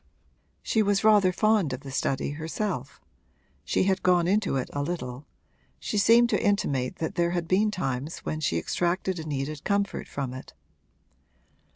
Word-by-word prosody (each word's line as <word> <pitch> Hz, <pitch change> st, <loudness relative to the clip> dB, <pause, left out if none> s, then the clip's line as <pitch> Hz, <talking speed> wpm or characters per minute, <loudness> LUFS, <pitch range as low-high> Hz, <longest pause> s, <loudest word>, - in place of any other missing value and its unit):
She 220 Hz, -, +2 dB
was 205 Hz, -1 st, +1 dB
rather 210 Hz, -4 st, +5 dB
fond 210 Hz, -7 st, +2 dB
of 130 Hz, -, -5 dB
the 135 Hz, -, -9 dB
study 135 Hz, +1 st, -1 dB
herself; 160 Hz, -, -4 dB, 0.6 s
she 85 Hz, -, +1 dB
had 190 Hz, 0 st, +1 dB
gone 175 Hz, -2 st, +3 dB
into 200 Hz, -3 st, +1 dB
it 130 Hz, -, -1 dB
a 145 Hz, -, -1 dB
little 140 Hz, -4 st, -5 dB, 0.5 s
she 210 Hz, -, -1 dB
seemed 235 Hz, +3 st, +6 dB
to -, -, +1 dB
intimate 145 Hz, -, 0 dB
that 160 Hz, -, -3 dB
there 170 Hz, -1 st, +1 dB
had 170 Hz, -1 st, -2 dB
been 200 Hz, +5 st, +3 dB
times 145 Hz, -6 st, -3 dB
when 155 Hz, -, -2 dB
she 135 Hz, -, 0 dB
extracted 175 Hz, -, -1 dB
a 155 Hz, -, -6 dB
needed 145 Hz, 0 st, -4 dB
comfort 200 Hz, -1 st, -1 dB
from 135 Hz, -3 st, -4 dB
it. 130 Hz, -, -10 dB
170 Hz, 165 wpm, -27 LUFS, 140-200 Hz, 0.6 s, seemed